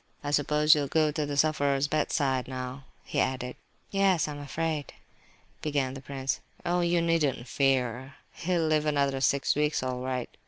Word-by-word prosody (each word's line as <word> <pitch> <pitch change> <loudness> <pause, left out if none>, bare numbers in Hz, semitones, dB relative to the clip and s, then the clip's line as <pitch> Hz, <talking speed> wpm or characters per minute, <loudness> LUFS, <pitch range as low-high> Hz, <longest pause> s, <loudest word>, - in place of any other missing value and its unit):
"I 145 - -2
suppose 150 +1 +4
you 150 - +2
will 140 - -2
go 155 +1 +2
to 150 0 -2
the 145 -1 -3
sufferer's 145 -2 +2
bedside 140 -3 0
now?" 130 +1 -6 0.2
he - - -2
added. 125 -1 -1 0.4
"Yes, 195 -5 +3
I - - -4
am 145 - -7
afraid..." 150 +1 -3 0.7
began 140 -4 -1
the 135 - -8
prince. 135 0 -3 0.3
"Oh, 175 +1 +1
you 170 0 +2
needn't 150 -7 +1
fear! 130 -1 0 0.2
He'll 170 -1 0
live 155 -1 +2
another 140 -2 +1
six 140 0 +2
weeks 150 -2 +1
all 130 -1 -2
right. 130 -1 -4
145 Hz, 170 wpm, -28 LUFS, 130-155 Hz, 0.7 s, suppose